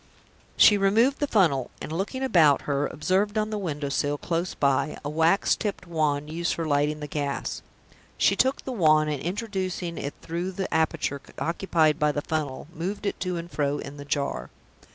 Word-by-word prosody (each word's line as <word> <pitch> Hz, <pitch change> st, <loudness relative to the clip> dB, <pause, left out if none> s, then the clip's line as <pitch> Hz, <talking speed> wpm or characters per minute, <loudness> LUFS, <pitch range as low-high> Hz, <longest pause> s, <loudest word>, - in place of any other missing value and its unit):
She 205 Hz, -1 st, +7 dB
removed 225 Hz, +8 st, +3 dB
the 290 Hz, -, 0 dB
funnel; 160 Hz, -, +2 dB
and, -, -, -7 dB
looking 200 Hz, +10 st, -3 dB
about 160 Hz, -, +4 dB
her, 145 Hz, 0 st, 0 dB
observed 195 Hz, +7 st, 0 dB
on 215 Hz, 0 st, 0 dB
the 210 Hz, -, -2 dB
window 150 Hz, -6 st, -3 dB
sill 145 Hz, +1 st, 0 dB
close 170 Hz, +3 st, -2 dB
by 140 Hz, +2 st, +1 dB
a 145 Hz, -, -2 dB
wax 165 Hz, +5 st, +3 dB
tipped 205 Hz, -3 st, -4 dB
wand 150 Hz, -4 st, 0 dB
used 170 Hz, +1 st, -1 dB
for 165 Hz, -, -3 dB
lighting 150 Hz, 0 st, +1 dB
the 150 Hz, -, -4 dB
gas. 145 Hz, -1 st, -3 dB, 0.6 s
She -, -, +4 dB
took 265 Hz, +1 st, +1 dB
the 265 Hz, -, -3 dB
wand, 155 Hz, -8 st, +3 dB
and, 145 Hz, -, -3 dB
introducing 185 Hz, -2 st, -3 dB
it 140 Hz, -, -5 dB
through 175 Hz, +3 st, -3 dB
the 190 Hz, +1 st, -3 dB
aperture 160 Hz, -3 st, 0 dB, 0.2 s
occupied 165 Hz, -3 st, +1 dB
by 150 Hz, -1 st, +3 dB
the 145 Hz, 0 st, -3 dB
funnel, 150 Hz, -4 st, -3 dB
moved 185 Hz, +6 st, -4 dB
it 200 Hz, -, -2 dB
to 180 Hz, -1 st, -2 dB
and 170 Hz, +1 st, -7 dB
fro 145 Hz, -1 st, 0 dB
in 140 Hz, +1 st, -8 dB
the 145 Hz, -, -8 dB
jar. 140 Hz, -, -2 dB
160 Hz, 185 wpm, -26 LUFS, 145-190 Hz, 0.6 s, She